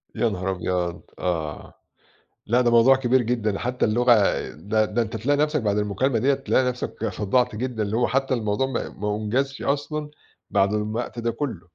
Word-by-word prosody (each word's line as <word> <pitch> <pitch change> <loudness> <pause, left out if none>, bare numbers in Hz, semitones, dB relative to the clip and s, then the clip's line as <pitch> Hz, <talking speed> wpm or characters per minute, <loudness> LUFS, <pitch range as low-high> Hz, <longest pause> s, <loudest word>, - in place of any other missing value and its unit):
يا 120 - +2
نهار 95 -1 -2
أبيض! 90 -1 -2 0.2
آه، 80 -4 -3 0.7
لأ 120 +3 +3
ده 120 -1 +2
موضوع 120 +3 +6
كبير 130 -1 +2
جدًا، 110 -4 -1
حتى 125 +1 0
اللغة 120 +3 +4 0.4
ده 105 +8 0
ده 120 +3 -1
أنت 110 0 -4
تلاقي 145 +6 +1
نَفسك 150 -1 +1
بعد 105 -1 0
المكالمة 105 +4 0
ديّة 140 +4 +3
تلاقي 135 -1 +1
نَفسك 125 -2 -4
صدّعت 115 +4 +1
جدًا، 120 -2 -2
اللي 105 +3 -1
هو 120 - +2
حتى 135 0 0
الموضوع 110 +2 0
ما 130 - -3
ما 105 0 -3
أُنجزش 130 +6 -1
أصلًا 150 +1 -2 0.4
بعد 100 0 +2
م - - +2
الوقت 110 +2 -3
ده 115 0 0
كله. 130 - -4
115 Hz, 185 wpm, -24 LUFS, 105-130 Hz, 0.7 s, موضوع